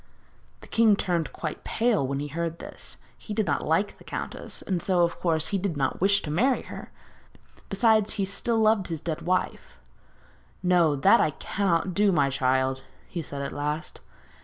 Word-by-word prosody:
The - - -13
king 225 -2 +4
turned 175 -5 -1
quite - - -6
pale 225 - +1
when 140 +1 -2
he 145 +1 -4
heard 165 +2 -3
this. - - -9 0.2
He 210 - -6
did 215 - +1
not - - 0
like 165 +7 0
the - - -15
countess, - - -6
and 185 -3 -1
so, 180 -2 +2
of 170 - -1
course, 160 -3 +1
he 200 - 0
did 180 -5 -2
not 135 +3 -1
wish 200 +1 +3
to 150 - -4
marry 250 - +2
her; - - -9 0.8
besides, 215 0 +3
he 200 -3 -1
still 225 +4 -1
loved 215 -3 +3
his 165 -2 -4
dead 165 +1 -4
wife. 180 +2 -2 0.9
'No, 175 -4 +4
that 135 - +5
I - - +3
cannot 185 +3 -1
do, 205 +2 +3
my 145 -6 +2
child,' 130 0 +1 0.3
he 170 - -4
said 140 -2 -6
at 140 - -4
last. 150 +2 -4
175 Hz, 185 wpm, -26 LUFS, 150-200 Hz, 0.9 s, that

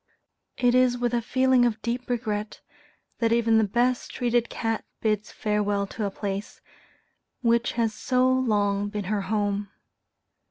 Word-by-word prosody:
It 245 -1 +3
is 250 -1 +4
with 245 0 -1
a 240 - +1
feeling 260 +2 +3
of 230 -3 +1
deep 240 +2 -3
regret, 215 -3 -3 0.6
that 230 -1 +2
even 230 -1 +4
the - - +3
best 240 +4 0
treated 240 -1 0
cat 225 -1 -2 0.2
bids 215 -1 -1
farewell 205 -1 0
to 210 +2 -4
a - - 0
place, 200 0 -5 0.8
which 235 0 +2
has 230 -2 0
so 255 +3 +1
long 205 -6 +1
been 210 -1 -4
her 205 - 0
home. 205 -1 -1
225 Hz, 150 wpm, -26 LUFS, 210-245 Hz, 0.8 s, is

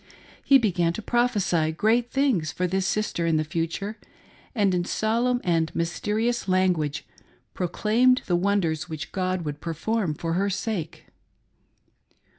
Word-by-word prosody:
He 275 - +6
began 180 -8 +1
to 220 - -5
prophesy 205 -10 +1
great 225 +8 +1
things 245 - +1
for 180 - -2
this 190 +1 0
sister 180 -3 -1
in 160 -1 +2
the 155 - +1
future, 165 +7 -3 0.6
and 200 -4 +2
in 175 -1 +1
solemn 235 +6 0
and 165 -2 +1
mys 170 0 -2
terious 225 +2 0
language 180 -6 +1 0.5
proclaimed 225 +8 +2
the 175 - +1
wonders 175 -3 0
which 155 -2 -6
God 185 -2 -2
would 145 0 -5
per 165 -1 -4
form 200 -2 -1
for 165 +2 -3
her 195 +3 +1
sake. 195 -5 -4
185 Hz, 145 wpm, -25 LUFS, 165-220 Hz, 0.6 s, He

